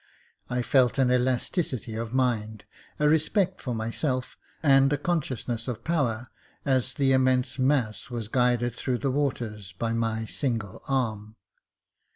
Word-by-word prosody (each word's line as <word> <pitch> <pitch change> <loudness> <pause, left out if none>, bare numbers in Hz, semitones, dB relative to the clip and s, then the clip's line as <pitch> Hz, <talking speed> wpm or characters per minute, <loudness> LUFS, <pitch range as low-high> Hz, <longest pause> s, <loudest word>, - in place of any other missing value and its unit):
I 125 0 0
felt 125 +1 +3
an 130 -2 +3
elasti 125 +7 +1
city 120 -6 -5
of 115 0 -4
mind, 110 -5 0 0.3
a 150 - +3
respect 180 +5 +2
for 125 -4 -3
myself, 125 +4 -2 0.3
and 135 -1 +5
a 145 - +2
consciousness 135 -8 -2
of 120 -2 -4
power, 125 -7 0 0.4
as 130 -2 +1
the 135 -1 +2
immense 130 0 +2
mas., 130 -5 +1
was 120 -3 -4
guided 120 0 +2
through 125 0 -1
the 135 +1 -1
waters 115 -8 -2
by 115 +5 -2
my 115 -1 -1
single 115 -5 -3
arm. 110 -5 -1
125 Hz, 145 wpm, -27 LUFS, 115-135 Hz, 0.4 s, and